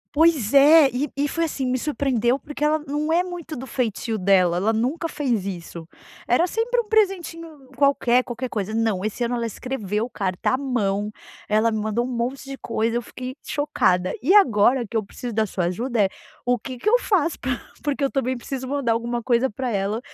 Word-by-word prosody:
Pois 300 -8 +3
é, 290 +1 +8
e 270 +4 -1
e 285 +1 +1
foi 330 +3 -1
assim 280 -4 -3
me 255 0 0
surpreendeu, 260 -4 +1
porque 295 +1 -7
ela 305 +1 +3
não 300 +2 -1
é 345 +2 +3
muito 350 -3 -7
do 260 - -6
feitio 230 -2 -2
dela, 185 -3 +3
ela 200 +5 +2
nunca 260 +10 -1
fez 250 -10 -1
isso. 170 -3 -7 0.4
Era 290 +9 +3
sempre 455 +6 0
um 445 - -15
presentinho 335 - -1
qualquer, 255 -2 +3
qualquer 250 +1 -4
coisa, 215 -2 -3
não, 220 -4 0
esse 215 +3 -2
ano 235 +1 -1
ela 235 -1 -1
escreveu 220 -2 -3
carta 190 -7 -2
à 255 - +2
mão, 210 -7 -1 0.4
ela 215 +2 +3
me 220 - -1
mandou 220 +3 -1
um - - -4
monte 245 +3 -2
de 275 - -6
coisa, 230 0 -1
eu - - -1
fiquei 255 +2 -7
chocada. 185 -11 +1
E 350 +10 +4
agora 245 - +5
que 225 - -10
eu 220 - +1
preciso 235 +4 -7
da 215 0 +1
sua 180 -2 -2
ajuda 225 +5 0
é, 195 - +2 0.4
o 245 0 +2
que 255 -2 -7
que 240 - -6
eu 485 +3 +5
faço 340 -9 +1
pra 250 -2 -2 0.2
porque 290 -1 -1
eu 275 - +1
também 260 -2 -1
preciso 260 +2 -5
mandar 275 -3 0
alguma 235 +1 -1
coisa 245 +2 +2
para 250 +3 -3
ela 200 +1 -1
250 Hz, 205 wpm, -23 LUFS, 220-290 Hz, 0.4 s, é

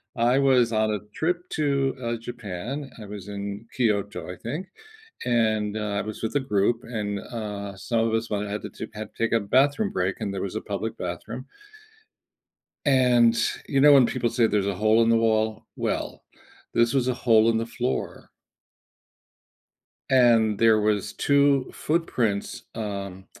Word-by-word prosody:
I 120 +3 +3
was 130 -4 +4
on 110 -1 +1
a 105 - -1
trip 175 +2 -2
to, 140 -3 0
uh, 120 -1 -2
Japan, 120 +4 -6
I 105 - -8
was 100 -1 -8
in 100 +2 -6
Kyoto, 105 -6 -1
I - - -7
think, 150 - -5 0.6
and 110 -3 +1
I 105 -1 -2
was 110 +2 -7
with 110 +5 -2
a - - +4
group, 115 -2 +1
and, 105 -4 -3
uh, 100 -3 -6
some 110 +5 -2
of 110 - -2
us 115 0 -1
one 105 0 -2
had 105 +1 -4
to - - -5
to 110 - -7
had 110 0 -7
to - - -4
take 115 - +1
a 115 - +4
bathroom 140 - +2
break, 95 +1 -1
and 105 -3 -3
there 95 - -3
was 100 +1 -4
a 110 - -2
public 105 +2 -4
bathroom. - - -6 1.4
And 125 -4 +4 0.3
you 135 - +2
know 145 +1 +8
when 135 -3 +7
people 120 0 -1
say 115 0 +2
there's 105 -2 0
a 100 - -1
hole 110 +4 +3
in 115 - +2
the 115 - +5
wall? 110 -1 +1
Well, - - -3 0.5
this 115 0 +3
was 130 -2 +1
a 130 - +2
hole 115 -2 +4
in 115 - +2
the 115 - -1
floor. 125 +2 -4 1.8
And 115 -5 +4
there 110 -1 +5
was 105 -2 0
2 140 -2 +3
footprints, 125 -11 -1
um, 100 -3 -5
115 Hz, 170 wpm, -25 LUFS, 105-125 Hz, 1.8 s, know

